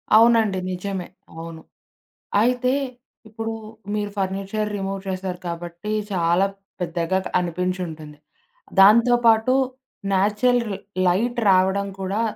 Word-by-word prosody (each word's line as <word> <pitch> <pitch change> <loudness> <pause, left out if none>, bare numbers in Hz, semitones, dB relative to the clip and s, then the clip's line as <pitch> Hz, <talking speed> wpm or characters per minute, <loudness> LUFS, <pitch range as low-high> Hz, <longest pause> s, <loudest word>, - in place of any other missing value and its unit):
అవునండి 220 -4 +5
నిజమే. 185 0 -4 0.3
అవును. 165 0 -8 0.8
అయితే 250 +2 +2 0.6
ఇప్పుడు 225 +1 -4 0.4
మీరు 205 -1 -2
ఫర్నిచర్ 195 +2 -2
రిమూవ్ 195 0 -3
చేసారు 185 -1 -4
కాబట్టి, 170 +4 -5 0.2
చాలా 175 0 +2 0.4
పెద్దగా 170 +1 0 0.2
అనిపించుంటుంది. 175 -3 -4 0.6
దాంతో 235 +5 +7
పాటు 225 +2 +5 0.6
న్యాచురల్ 210 +6 +2 0.4
లైట్ 230 +8 +1
రావడం 190 +2 +3
కూడా 195 +4 -1
195 Hz, 90 wpm, -23 LUFS, 180-220 Hz, 0.8 s, దాంతో